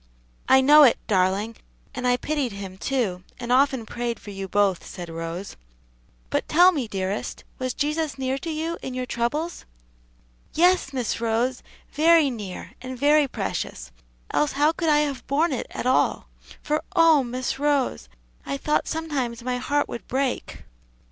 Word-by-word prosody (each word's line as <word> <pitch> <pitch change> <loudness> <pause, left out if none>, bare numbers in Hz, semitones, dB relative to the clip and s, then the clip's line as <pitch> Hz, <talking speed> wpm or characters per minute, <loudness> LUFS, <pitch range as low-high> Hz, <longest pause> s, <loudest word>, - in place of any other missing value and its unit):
"I 265 0 +7
know 295 +3 +8
it, 270 -5 +7
darling, 200 +2 +1 0.4
and 250 -1 -2
I 245 0 +3
pitied 285 -5 -2
him, 195 -2 -7
too, 210 -10 -1 0.2
and 240 0 -4
often 265 -2 +3
prayed 240 0 -3
for 205 - -10
you 195 -1 -5
both," 195 -2 +1
said 175 -2 -8
Rose. 165 +3 -6 0.8
"But - - 0
tell 355 +4 +7
me, 280 -9 -2
dearest, 195 0 -3 0.2
was 255 -1 -2
Jesus 305 0 -1
near 265 0 -1
to 330 - -6
you 325 +2 -3
in 260 - -5
your 255 0 -2
troubles?" 290 +9 -2 0.9
"Yes, 355 -3 +3
Miss 250 -4 -2
Rose, 235 +3 0 0.3
very 315 -1 +4
near, 205 -6 -7
and 255 0 -6
very 295 +2 +4
precious; 65 - -4 0.4
else 295 - +1
how 295 +3 +3
could 330 0 -1
I 295 0 +5
have 285 -3 -3
borne 300 +5 +2
it 255 - -3
at - - -5
all? 255 +1 +2 0.4
for 305 +1 -1
oh, 325 -5 +6
Miss 255 +2 -3
Rose, 285 -3 0 0.3
I 275 - -3
thought 300 +2 0
sometimes 270 -8 -3
my 250 0 -1
heart 290 +3 0
would 235 - -7
break!" 265 0 -2
260 Hz, 160 wpm, -24 LUFS, 230-295 Hz, 0.9 s, know